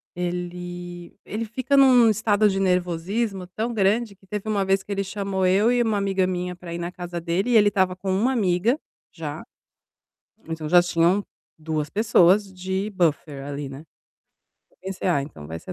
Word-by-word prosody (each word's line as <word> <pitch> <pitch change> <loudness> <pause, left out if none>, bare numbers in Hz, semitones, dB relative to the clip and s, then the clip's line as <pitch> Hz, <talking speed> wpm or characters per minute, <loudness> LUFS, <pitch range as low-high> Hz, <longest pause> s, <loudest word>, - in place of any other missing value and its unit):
Ele 175 0 -5
ele 220 +2 -4
fica 260 +5 -1
em - - +7
um 250 -4 +6
estado 215 0 +3
de 195 0 -1
nervosismo 185 +2 -1
tão 220 +6 -3
grande 210 +1 +1
que 195 0 -25
teve 210 +1 -5
uma 200 -2 +1
vez 195 0 +1
que - - -9
ele 200 0 -1
chamou 195 -1 -2
eu 200 +6 +4
e 245 0 +2
uma 220 -3 +1
amiga 195 -2 +1
minha 180 -1 -3
pra 175 -1 -9
ir - - -3
na 170 +1 -4
casa 175 -1 -6
dele, 180 +8 -1
e - - +3
ele 205 -1 +6
estava 185 -2 +1
com 190 +1 -3
uma 220 +8 +2
amiga, 210 +2 +2 0.3
já. - - -6 1.1
Então, 160 -1 -4
já 175 +3 +6
tinham 175 +3 +2 0.3
2 155 -1 -3
pessoas 200 -2 +3
de 190 +2 -3
buffer 155 -6 -1
ali, 140 -1 -5
né, 135 +3 -9 0.9
eu - - -31
pensei: 190 0 -4
"Ah, 145 -6 +2
então 110 - -10
vai 80 +2 -6
ser - - -8
190 Hz, 185 wpm, -24 LUFS, 175-205 Hz, 1.1 s, em